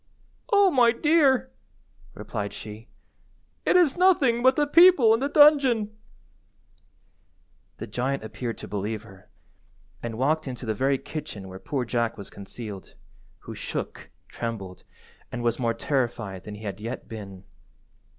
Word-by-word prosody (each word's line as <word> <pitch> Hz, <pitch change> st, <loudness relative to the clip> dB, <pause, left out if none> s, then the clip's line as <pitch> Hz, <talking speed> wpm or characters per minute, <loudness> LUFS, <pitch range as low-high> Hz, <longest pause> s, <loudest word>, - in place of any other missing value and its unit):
"Oh, 405 Hz, -2 st, +5 dB
my 245 Hz, -5 st, +5 dB
dear," 285 Hz, -, +3 dB, 0.6 s
replied 100 Hz, -1 st, -5 dB
she, 110 Hz, +2 st, -9 dB, 0.8 s
"it -, -, +4 dB
is 350 Hz, -6 st, +5 dB
nothing 315 Hz, -10 st, +3 dB
but 260 Hz, +1 st, +5 dB
the 295 Hz, -, +2 dB
people 300 Hz, -7 st, +6 dB
in 225 Hz, -, +2 dB
the 280 Hz, +2 st, -1 dB
dungeon." 275 Hz, -8 st, +5 dB, 1.8 s
The -, -, -6 dB
giant 125 Hz, +4 st, -2 dB
appeared 115 Hz, +1 st, -5 dB
to -, -, -9 dB
believe 105 Hz, +1 st, -4 dB
her, 95 Hz, -4 st, -16 dB, 0.7 s
and 115 Hz, -1 st, -5 dB
walked 150 Hz, +4 st, 0 dB
into 125 Hz, -1 st, -6 dB
the 110 Hz, -, -1 dB
very 135 Hz, +5 st, +1 dB
kitchen 105 Hz, -10 st, -7 dB
where 95 Hz, 0 st, -9 dB
poor 130 Hz, +2 st, -3 dB
Jack 115 Hz, -1 st, -1 dB
was 100 Hz, -, -9 dB
concealed, 100 Hz, -1 st, -9 dB, 0.5 s
who -, -, -9 dB
shook, -, -, -6 dB, 0.2 s
trembled, 100 Hz, -6 st, -6 dB, 0.5 s
and 120 Hz, -, -5 dB
was 120 Hz, 0 st, 0 dB
more 115 Hz, -2 st, 0 dB
terrified 115 Hz, -8 st, -2 dB
than 105 Hz, -, -7 dB
he 105 Hz, -, -11 dB
had 100 Hz, -1 st, -6 dB
yet 115 Hz, +4 st, -6 dB
been. 100 Hz, -4 st, -9 dB
125 Hz, 140 wpm, -25 LUFS, -, 1.8 s, people